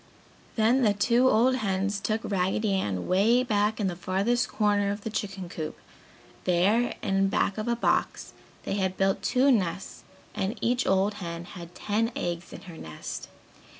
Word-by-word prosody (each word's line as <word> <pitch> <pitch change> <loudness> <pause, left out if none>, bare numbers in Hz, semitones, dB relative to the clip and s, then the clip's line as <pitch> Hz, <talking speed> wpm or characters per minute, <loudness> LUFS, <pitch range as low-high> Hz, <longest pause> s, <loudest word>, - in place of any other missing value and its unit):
Then 230 +4 +3
the 210 -4 +3
two 240 +5 +3
old 255 +3 +3
hens 200 -2 -1
took 215 +2 -1
Raggedy 195 +2 0
Ann 100 - -1
'way 220 +7 +4
back 210 -2 +1
in 210 - 0
the 180 -2 -1
farthest 195 +7 0
corner 205 -2 +1
of 205 +1 -4
the 220 - -5
chicken 195 -3 -4
coop. 160 -2 -6 0.7
There, 200 +7 +2
in 195 0 +2
back 200 +1 0
of 215 - -3
a 235 - +2
box, 235 - 0 0.3
they - - -3
had 190 -1 -1
built 195 0 +1
two 265 +2 +3
nests 195 -5 -1 0.3
and 200 +6 -2
each 245 +2 0
old 195 +2 +2
hen 170 -1 -5
had 175 -1 -10
ten 220 +5 0
eggs 175 0 -4
in - - -9
her 175 -4 -11
nest. 80 - -7
200 Hz, 170 wpm, -27 LUFS, 185-225 Hz, 0.7 s, way